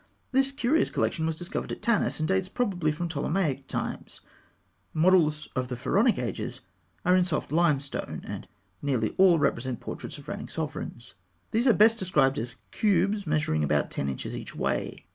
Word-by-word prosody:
This 270 +1 +3
curious 275 +3 +2
collection 160 -2 0
was 160 - -1
discovered 175 +3 -5
at - - -6
Tanis, 235 -3 +2
and 155 - -1
dates 190 0 +1
probably 185 -9 0
from 170 +3 -3
Ptolemaic 155 -3 -1
times. - - -5 0.7
Models 155 -3 +3
of 130 0 -1
the 125 -1 -4
Pharaonic 215 - +2
ages - - -4 0.4
are 180 +1 +5
in 185 - +5
soft 170 -5 -2
limestone, 150 -4 0
and - - -6 0.3
nearly 125 -7 0
all 185 -3 +7
represent 130 -4 0
portraits - - -7
of - - -13
reigning - - -5
sovereigns. 115 -6 -5 0.4
These 235 +4 +2
are 240 - +7
best 225 +2 +5
described 155 -9 +2
as 120 +1 -4 0.2
cubes 205 -1 +1
measuring 150 - +1
about 75 -1 +1
ten 70 - -2
inches 65 - -4
each - - -7
way. - - -2
165 Hz, 165 wpm, -27 LUFS, 135-195 Hz, 0.7 s, all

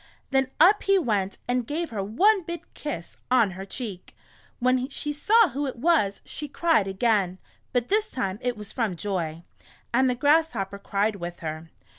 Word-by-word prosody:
Then 265 -1 +3
up 380 +6 +6
he 395 0 +3
went 205 - 0
and 245 -1 0
gave 325 +1 -3
her 210 -3 -2
one 380 - +3
big 340 0 -6
kiss 285 - -6
on 235 -6 +4
her 190 +1 -7
cheek. 200 -3 -6 0.4
When 255 +1 +1
she 295 +1 -3
saw 420 +8 +4
who 280 +2 -2
it 260 - -4
was, 245 -7 +1
she 295 - -4
cried 310 - +2
again, 195 -2 +1 0.3
but 245 -1 0
this 430 +2 +2
time 200 - -3
it 245 -2 -1
was 210 -1 -8
from 225 -7 -1
joy, 170 -4 -3 0.5
and 260 +2 +4
the 250 - 0
Grasshopper 250 -9 +1
cried 200 +1 0
with 175 -1 -7
her. 160 0 -5
245 Hz, 175 wpm, -26 LUFS, 195-295 Hz, 0.5 s, up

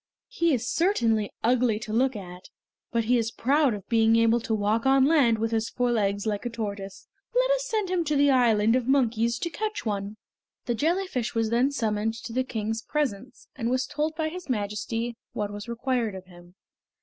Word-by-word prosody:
He 340 -9 +1
is 245 -3 0
certainly 230 - +1
ugly 240 -1 +2
to 215 0 -6
look 255 +2 +2
at, 180 -2 -9 0.4
but 230 -1 +1
he 240 +2 +2
is 225 -1 -1
proud 275 +1 +2
of 200 - -10
being 225 -1 +4
able 230 +1 +4
to 225 -1 -1
walk 215 +4 0
on 270 0 +5
land 275 -7 +4
with 225 +1 -1
his 225 0 0
four 245 -1 0
legs 200 -3 0
like 210 -2 -2
a 240 - -2
tortoise. 200 -4 -6 0.3
Let - - +3
us - - +1
send 430 -6 -1
him 360 -2 +1
to 300 0 0
the 285 0 +4
Island 225 -3 +4
of 255 -1 0
Monkeys 235 -3 +2
to 340 - -3
catch 430 - -4
one." 205 0 -3 0.5
The 240 - 0
jellyfish 315 - -1
was 225 -1 0
then 245 +4 +3
summoned 220 -4 -1
to 230 0 -8
the 260 +2 +1
King's 225 -2 -3
presence, 260 -4 -3
and 235 -3 -2
was 255 +1 +1
told 310 +1 -2
by 315 0 -1
his 355 -2 -9
Majesty 225 +1 -2 0.2
what 205 -1 -3
was 205 +3 -7
required 235 -3 -1
of 185 -1 -9
him. 175 0 -17
235 Hz, 200 wpm, -26 LUFS, 215-270 Hz, 0.5 s, on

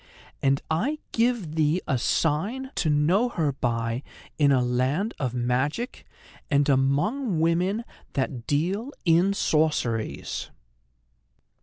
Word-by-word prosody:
"And 135 0 +2
I 250 - 0
give 230 -9 0
thee 160 +2 +2
a 135 -4 +1
sign 200 - 0
to 160 - 0
know 170 +11 +3
her 155 -10 0
by 115 -2 -1 0.4
in 145 -2 +5
a 135 - +4
land 130 - 0
of 125 -3 -2
magic, 130 - -1 0.4
and 145 -1 +3
among 150 - +1
women 180 +7 +1 0.3
that 130 -3 -2
deal 190 - -1
in 175 +4 +4
sorceries. 150 - 0
155 Hz, 115 wpm, -26 LUFS, 135-200 Hz, 0.4 s, in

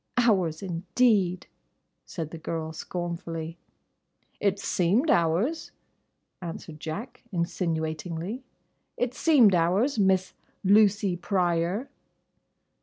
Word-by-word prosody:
"Hours, 190 -9 +2
indeed!" 185 +1 +1 0.6
said 160 -3 -5
the 165 - -7
girl, 160 0 -4
scornfully. 170 -1 -5 0.8
"It 200 -1 +1
seemed 200 - +2
hours," 180 - +1 0.7
answered 165 -2 -7
Jack, 205 - -6
insinuatingly. 170 - -2 0.5
"It 245 0 -1
seemed 265 - +5
hours—Miss—Lucy 195 0 +2
Pryor." 180 +4 0
180 Hz, 75 wpm, -27 LUFS, 165-210 Hz, 0.8 s, seemed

